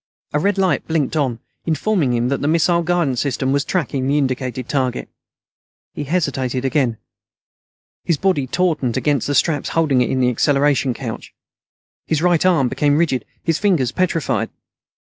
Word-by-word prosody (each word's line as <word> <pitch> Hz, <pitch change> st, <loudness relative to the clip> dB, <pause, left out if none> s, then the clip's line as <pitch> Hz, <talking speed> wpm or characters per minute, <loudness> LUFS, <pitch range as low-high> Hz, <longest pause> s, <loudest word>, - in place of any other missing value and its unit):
A 150 Hz, -, +2 dB
red 200 Hz, +5 st, +1 dB
light 190 Hz, -2 st, +1 dB
blinked 160 Hz, -2 st, 0 dB
on, 135 Hz, -6 st, 0 dB, 0.3 s
informing 165 Hz, -3 st, +1 dB
him 120 Hz, +1 st, 0 dB
that 140 Hz, -, -1 dB
the 145 Hz, -, 0 dB
missile 170 Hz, +2 st, +3 dB
guidance 165 Hz, -7 st, 0 dB
system 135 Hz, -1 st, -1 dB
was 140 Hz, 0 st, +1 dB
tracking 140 Hz, -7 st, -1 dB
the 140 Hz, +2 st, +2 dB
indicated 130 Hz, -2 st, -2 dB
target. 130 Hz, -3 st, -1 dB, 0.8 s
He 145 Hz, -, -5 dB
hesitated 135 Hz, -5 st, -1 dB
again. 130 Hz, -4 st, +1 dB, 1.1 s
His 170 Hz, -, +1 dB
body 165 Hz, -6 st, +1 dB
tautened 150 Hz, -7 st, 0 dB
against 145 Hz, -5 st, 0 dB
the 145 Hz, -, 0 dB
straps 150 Hz, -2 st, +1 dB
holding 145 Hz, -6 st, +3 dB
it 125 Hz, -, +1 dB
in 130 Hz, -, 0 dB
the 125 Hz, -1 st, +3 dB
acceleration 140 Hz, 0 st, +2 dB
couch. 115 Hz, -4 st, -7 dB, 0.7 s
His 160 Hz, 0 st, 0 dB
right 175 Hz, -2 st, +3 dB
arm 170 Hz, -8 st, +3 dB
became 145 Hz, +3 st, +1 dB
rigid; 140 Hz, -8 st, 0 dB, 0.2 s
his 165 Hz, -1 st, 0 dB
fingers 170 Hz, -, +2 dB
petrified. 170 Hz, -4 st, 0 dB
145 Hz, 160 wpm, -19 LUFS, 130-165 Hz, 1.1 s, missile